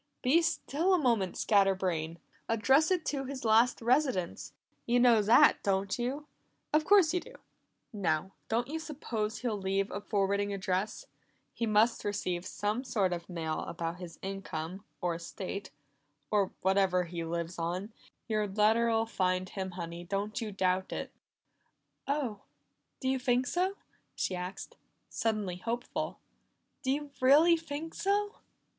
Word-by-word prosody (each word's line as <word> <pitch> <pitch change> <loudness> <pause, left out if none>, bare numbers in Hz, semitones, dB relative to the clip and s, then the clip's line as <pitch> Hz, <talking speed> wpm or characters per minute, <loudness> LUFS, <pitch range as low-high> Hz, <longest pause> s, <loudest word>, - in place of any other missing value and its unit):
"Be 285 +7 +5
still 335 +2 +1
a - - +3
moment, 230 - +1
scatter 195 -2 +4
brain! 170 -3 -2 0.3
Address 265 +7 +4
it 360 -4 +1
to 275 -2 -2
his 260 -2 -6
last 225 +2 +4
residence; 245 - +1 0.4
you 240 +1 +3
know 240 -3 +6
that, 220 +4 +6
don't 195 +2 0
you? 265 +5 -2 0.5
Of 305 0 +3
course 375 -4 +6
you 360 - +2
do. - - -13 0.6
Now, 185 -3 0 0.2
don't 235 +2 +1
you 315 +3 -3
suppose 235 -9 -4
he'll 225 -5 -1
leave 195 +1 0
a 200 - -4
forwarding 200 0 0
address? 195 - -2 0.5
He 230 - -2
must 220 +2 +3
receive 185 -3 -2
some 210 +6 -2
sort 205 -8 +1
of 170 0 -6
mail 160 -3 -2
about 165 0 -4
his 175 -2 -8
income, 190 -1 -5 0.2
or 175 -1 0
estate, 185 +4 -6 0.6
or 200 -3 +3
whatever 190 -1 +3
he 170 -1 -5
lives 170 +1 -4
on. 180 +6 -3 0.3
Your 215 -2 0
letter'll 225 +3 +3
find 185 -4 0
him, 190 -2 -4
Honey; 170 -1 -6
don't 200 +5 -2
you 220 -2 -3
doubt 185 -1 0
it." - - -4 1.0
"Oh, 270 -8 -1 0.6
do 260 - -3
you 265 0 +1
think 250 0 +2
so?" 370 +7 0 0.4
she 185 - -1
asked, 180 +2 -6 0.3
suddenly 210 -5 -1
hopeful. 235 +6 -3 0.6
"Do 260 - -3
you 290 +1 -1
really 300 +6 +7
think 320 0 -6
so?" 410 +1 0
210 Hz, 145 wpm, -31 LUFS, 185-255 Hz, 1.0 s, really